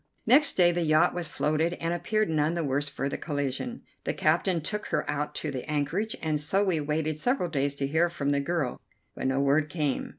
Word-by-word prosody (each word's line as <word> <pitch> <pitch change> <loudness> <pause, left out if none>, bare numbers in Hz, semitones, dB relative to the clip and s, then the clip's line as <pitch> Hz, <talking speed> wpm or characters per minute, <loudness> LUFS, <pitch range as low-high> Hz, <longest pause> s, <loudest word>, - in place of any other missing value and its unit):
Next 280 +6 +6
day 175 -2 +5
the 175 0 -1
yacht 155 0 +3
was 175 -2 -3
floated 155 +4 0
and 165 -1 -2
appeared 215 +5 0
none 155 +1 +1
the 170 - -1
worse 145 +1 -1
for 140 -1 -3
the - - -4
collision. 145 - -3 0.2
The - - -2
captain 180 -4 +2
took 210 +7 -4
her 150 - -1
out 150 0 -2
to 150 - -3
the 130 -2 -4
anchorage, 160 +9 -1
and 155 -2 0
so 190 +7 +1
we 185 -5 +1
waited 155 +1 -1
several 245 - 0
days 140 -2 0
to 140 - -1
hear 160 +5 +2
from 145 -4 -2
the 140 - +2
girl, 140 -3 -2 0.3
but - - -3
no 130 +1 +1
word 145 +2 +2
came. 150 -4 -1
155 Hz, 220 wpm, -28 LUFS, 145-175 Hz, 0.3 s, Next